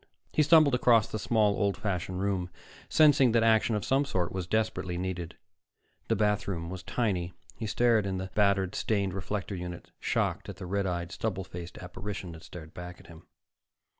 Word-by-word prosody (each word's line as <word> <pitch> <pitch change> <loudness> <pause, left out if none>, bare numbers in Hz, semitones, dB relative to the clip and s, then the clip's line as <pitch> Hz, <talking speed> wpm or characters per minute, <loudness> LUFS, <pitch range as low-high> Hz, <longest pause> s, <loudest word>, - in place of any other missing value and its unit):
He - - +4
stumbled 155 -2 +6
across 120 -4 +4
the 110 - -4
small, 105 -1 +2
old 100 -1 +1
fashioned 95 -2 -2
room, 95 -3 -1 0.4
sensing 140 -6 +5
that 115 -1 +4
action 110 0 +4
of 105 - -2
some 135 +2 +3
sort 90 -11 -1
was 95 -2 -4
desperately 105 -4 -1
needed. 90 -2 -4 0.7
The - - +2
bathroom 100 -5 0
was 95 -1 -6
tiny; 95 -4 -1 0.2
he 110 - -4
stared 110 -1 +3
in 95 -1 -2
the 95 0 -5
battered, 100 -2 +2
stained 100 -4 0
reflector 100 +1 -3
unit, 90 -2 -6
shocked - - -1
at - - -6
the - - -7
red 100 +1 -1
eyed 85 -1 -3
stubble 95 -2 -2
faced 85 -1 -8
apparition 95 0 -6
that 80 -1 -10
stared 80 -3 -10
back 90 0 -8
at - - -16
him. 85 -1 -14
95 Hz, 180 wpm, -29 LUFS, 90-110 Hz, 0.7 s, stumbled